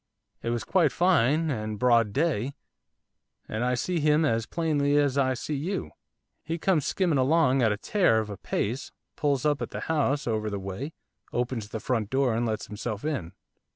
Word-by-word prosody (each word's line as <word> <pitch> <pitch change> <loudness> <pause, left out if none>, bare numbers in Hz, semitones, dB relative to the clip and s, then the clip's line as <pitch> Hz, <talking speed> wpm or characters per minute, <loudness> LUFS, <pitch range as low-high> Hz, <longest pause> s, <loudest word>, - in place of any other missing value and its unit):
It 115 - -3
was 120 -1 -1
quite 170 -5 +3
fine, 160 -3 +3
and 110 -4 -3
broad 115 -2 +3
day, 140 -1 0 0.9
and 110 +2 -2
I 125 0 +1
see 175 +7 -1
him 150 +1 +3
as 115 -5 0
plainly 145 -4 +1
as 145 -2 +2
I 130 -2 +2
see 150 - -4
you, 145 - -3 0.5
he 165 +2 -3
comes 170 -4 +1
skimming 170 -7 +1
along 135 -1 +3
at 110 -3 +4
a 105 - -1
tear 175 - +2
of 110 -1 -1
a 100 - -6
pace, 115 +7 -3 0.2
pulls 145 -1 0
up 145 -2 +2
at - - -3
the - - -6
house 150 -2 0
over 110 -2 -1
the 100 - -3
way, 100 - -5 0.4
opens 120 -3 -2
the 110 - -4
front 110 -2 -1
door, 130 -2 +2
and 115 +1 0
lets 110 -1 -2
himself 105 +3 -5
in. 125 - -3
130 Hz, 190 wpm, -27 LUFS, 110-150 Hz, 0.9 s, at